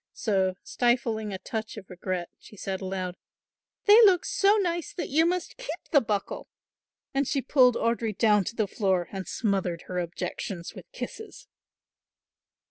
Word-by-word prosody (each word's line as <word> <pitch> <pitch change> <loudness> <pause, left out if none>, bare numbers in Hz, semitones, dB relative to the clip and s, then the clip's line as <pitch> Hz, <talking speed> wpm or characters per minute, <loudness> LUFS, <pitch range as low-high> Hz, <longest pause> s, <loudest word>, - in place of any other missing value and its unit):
So, 190 -4 0
stifling 235 -3 0
a 190 - -3
touch 220 +3 -5
of 200 -2 -9
regret, 180 -1 -4
she 210 - -15
said 190 0 -4
aloud, 185 -1 -4 0.7
"They 425 +3 +9
look 385 -6 +6
so 420 -5 +3
nice 345 -4 -1
that 355 - -4
you 320 +4 +4
must 360 0 -2
keep - - -5
the 285 - +6
buckle"; 205 -3 -3 0.6
and 275 0 +1
she 280 - +1
pulled 255 -2 +4
Audry 230 -3 0
down 210 -3 +4
to 230 - -5
the 215 -3 0
floor 190 -4 0
and 190 -2 -5
smothered 190 -6 -1
her 180 -1 -3
objections 175 +1 -5
with - - -12
kisses. 445 -3 -8
220 Hz, 155 wpm, -27 LUFS, 190-285 Hz, 0.7 s, They